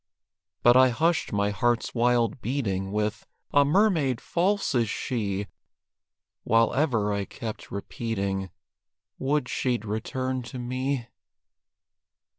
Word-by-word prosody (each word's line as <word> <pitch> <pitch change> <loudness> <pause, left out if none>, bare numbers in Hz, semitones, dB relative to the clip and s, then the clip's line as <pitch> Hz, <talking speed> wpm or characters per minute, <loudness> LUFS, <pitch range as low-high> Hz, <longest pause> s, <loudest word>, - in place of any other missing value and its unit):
But 120 0 +7
I 130 0 +7
hushed 160 +7 +1
my 100 0 +1
heart's 120 +3 0
wild 120 -1 +2
beating, 100 -7 -2
With 105 +1 -2 0.3
"a 145 - +6
mermaid 150 - +2
false 195 +2 0
is 120 -4 +2
she!" 100 -5 -2 1.0
While 115 +1 +3
ever 115 -8 +1
I 100 -1 -1
kept 110 +1 -7
repeating, 100 -2 -3 0.7
"Would 140 -1 0
she'd 120 -3 -1
return 130 +5 -2
to 125 +1 -8
me!" 130 +1 -2
120 Hz, 110 wpm, -26 LUFS, 105-130 Hz, 1.0 s, But